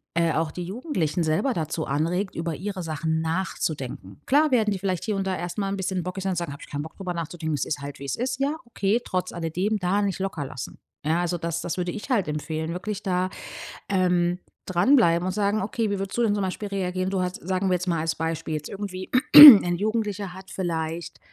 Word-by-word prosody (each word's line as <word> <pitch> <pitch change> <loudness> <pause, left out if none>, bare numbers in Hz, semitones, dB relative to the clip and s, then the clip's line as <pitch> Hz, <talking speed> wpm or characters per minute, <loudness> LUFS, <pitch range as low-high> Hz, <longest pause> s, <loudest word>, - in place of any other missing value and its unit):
äh, 170 -1 +2
auch 160 0 0
die 180 - -6
Jugendlichen 185 - -2
selber 160 - +1
dazu 160 -2 -3
anregt, 170 +7 -1
über 165 0 -2
ihre 190 +3 -5
Sachen 160 0 -1
nachzudenken. 155 - -3
Klar 295 +2 +4
werden 225 -4 +3
die 200 - -1
vielleicht 185 -2 -2
hier 215 - -1
und 195 -1 -2
da 190 -1 -1
erst 175 +1 -5
mal 200 -2 -1
'n 195 - -2
bisschen 185 -1 -2
bockig 185 +2 -5
und 190 -1 0
sagen: 170 -4 -3
„Habe 140 - -12
ich - - -22
kein 145 0 -3
Bock 160 - -10
darüber 185 -3 -4
nachzudenken. 165 -1 -3
Es 145 - -2
ist 145 - -3
halt, 140 0 -8
wie 140 - -7
es 135 - -2
ist.“ 255 +2 -3
Ja, 280 +3 0
okay. 225 0 0
Trotz 185 0 -2
alledem 180 +6 -1
da 190 +2 +1
nicht 195 -2 -1
locker 190 -6 -3
lassen. 125 -2 -7 0.3
Ja 160 +3 +2
also, 175 0 -1
das 170 0 -3
das 175 - -4
würde 180 -1 -1
ich 215 +7 -7
halt 215 -9 +2
empfehlen. 155 +2 -3
Wirklich 200 +3 -4
da, 185 -1 0 0.6
ähm, 180 -2 +1 0.3
dran 185 +10 +4
bleiben 170 -8 +3
und 185 - 0
sagen: 205 +2 0
„Okay, 220 +2 -1
wie 200 -1 -2
würdest 195 +3 -4
du - - +2
denn 210 -3 +2
zum 200 - -1
Beispiel 190 +2 -4
reagieren?“ 185 -1 -2
Du 190 -1 -1
hast, 180 0 -2
sagen 190 +1 0
wir - - +2
jetzt 180 +1 -1
mal 170 -2 +1
als 160 0 -1
Beispiel 160 -1 -3
jetzt 150 -1 -4
irgendwie 190 -2 -6 0.3
ein 235 -13 +12
Jugendlicher 205 -2 -2
hat 190 +1 -12
vielleicht, 165 -2 -4
180 Hz, 230 wpm, -25 LUFS, 165-200 Hz, 0.6 s, ein